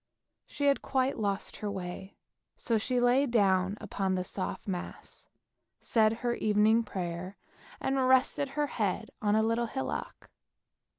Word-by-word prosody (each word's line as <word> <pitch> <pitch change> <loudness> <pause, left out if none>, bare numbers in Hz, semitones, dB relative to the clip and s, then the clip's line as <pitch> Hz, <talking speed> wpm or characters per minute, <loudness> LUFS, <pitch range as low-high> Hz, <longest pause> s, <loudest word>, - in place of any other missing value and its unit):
She 285 - -3
had 280 -1 +3
quite 260 -1 0
lost 200 -2 -2
her 210 - -3
way, 190 0 -6 0.4
so 230 -2 0
she 250 +3 0
lay 250 +3 +4
down 195 -4 +2
upon 190 -1 -2
the 185 - -1
soft 185 +2 -4
moss, 180 -3 -6 0.5
said 220 -2 +3
her 240 - +2
evening 215 +1 +3
prayer, 185 -2 -5 0.4
and 265 -1 +1
rested 260 +2 +3
her 295 - +2
head 220 -4 -2
on 210 0 +2
a 220 - +3
little 230 +1 +1
hillock. 130 -11 -5
215 Hz, 140 wpm, -30 LUFS, 190-245 Hz, 0.5 s, lay